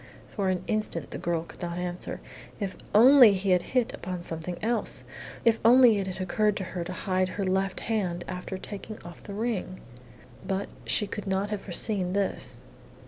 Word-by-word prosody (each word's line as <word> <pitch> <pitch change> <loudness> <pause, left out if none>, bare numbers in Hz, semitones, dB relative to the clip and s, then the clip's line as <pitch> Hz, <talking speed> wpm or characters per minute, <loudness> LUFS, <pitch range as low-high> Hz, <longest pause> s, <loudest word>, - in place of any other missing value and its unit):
For 195 -3 -1
an 185 -1 -1
instant 215 -8 -2
the - - -5
girl 170 -1 -1
could - - -14
not 170 -1 -3
answer. 180 0 -4 0.4
If 200 -3 -3 0.2
only 245 0 +8
he 190 0 0
had 180 -1 +4 0.2
hit 245 -2 +2
upon 180 -1 -5
something 165 +1 -4
else. 235 +2 -1 0.4
If 225 -1 +4
only 235 -2 +7
it 195 - -2
had 185 0 -5
occurred 210 +3 +1
to 190 - -3
her 180 -2 -2
to 175 - -6
hide 185 0 0
her 200 - -3
left 190 0 0
hand 185 -6 -1
after 180 +1 -5
taking 205 +2 -8
off 175 -1 -10
the 200 - -8
ring! 210 -4 -2 0.6
But 195 +1 -2 0.2
she 210 - +1
could 205 0 -6
not 195 +2 0
have 210 -2 -2
foreseen 185 0 +1
this. 200 0 -1
190 Hz, 185 wpm, -28 LUFS, 180-210 Hz, 0.6 s, only